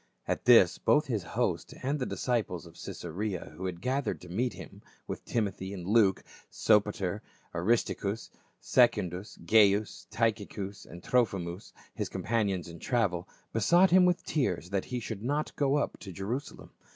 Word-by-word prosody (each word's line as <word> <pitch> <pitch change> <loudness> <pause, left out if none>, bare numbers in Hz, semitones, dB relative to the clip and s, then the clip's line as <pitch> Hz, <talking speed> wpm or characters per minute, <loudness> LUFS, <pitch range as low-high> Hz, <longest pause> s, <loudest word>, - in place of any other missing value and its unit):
At - - -2
this 115 -7 +6
both 150 +1 +3
his 115 -7 -1 0.2
host - - -1
and 140 +3 0
the 125 - -1
disciples 110 -9 -1
of 85 - -13
Caesarea 90 +3 -5
who 95 +3 -4
had 85 -2 -6
gathered 130 - -1
to - - -11
meet 120 +8 -1
him, - - -11 0.2
with - - -6
Timothy 100 -3 -2
and 90 -2 -7
Luke, 100 -1 +3 0.3
Sopatcr, 105 -2 +2 0.3
Aristarchus 100 +3 0
and - - -30 0.2
Secundus, 105 -6 +2
Gaius, 105 +1 +3
Tychicus 105 -3 -2
and 85 +1 -11
Trophimus, 95 -7 0 0.2
his - - -3
companions 100 -5 -1
in 85 -1 -10
travel, 100 -8 0 0.2
besought 175 - +4
him 185 0 +7
with 180 -1 +1
tears 95 - -1
that 100 -1 0
he 125 - -3
should 110 -3 -6
not 145 +6 -2
go 140 -1 +2
up 145 - -1
to 95 - -8
Jerusalem. 110 - -5
105 Hz, 155 wpm, -30 LUFS, 95-120 Hz, 0.3 s, him